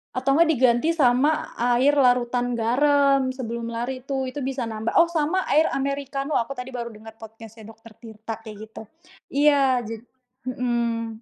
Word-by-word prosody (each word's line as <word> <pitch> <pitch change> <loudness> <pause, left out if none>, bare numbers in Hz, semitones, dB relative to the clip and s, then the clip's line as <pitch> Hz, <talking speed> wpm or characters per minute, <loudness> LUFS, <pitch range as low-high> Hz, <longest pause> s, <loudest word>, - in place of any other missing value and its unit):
Atau 275 +3 +1
enggak 335 -1 +4
diganti 255 +5 +2
sama 290 +2 +2
air 245 +3 +3
larutan 245 -1 +2
garam 275 +3 +2
sebelum 235 -2 -5
lari 255 +2 -4
tuh, 265 -2 -2
itu 290 - -7
bisa 265 -1 -3
nambah 220 0 -4
oh 335 - +2
sama 335 +3 0
air 310 +3 +4
Americano. 275 +1 -2
Aku 240 +4 -3
tadi 250 0 -7
baru 235 -2 -6
denger 220 +1 -13
podcast 225 0 -12
nya 220 - -12
dokter 225 0 -15
Tirta 225 -1 -8
kayak 215 -1 -9
gitu. 220 - -10 0.5
Iya 275 -3 +3
jad 225 -1 -7 0.4
mhm. 235 -3 -2
250 Hz, 160 wpm, -23 LUFS, 230-275 Hz, 0.5 s, enggak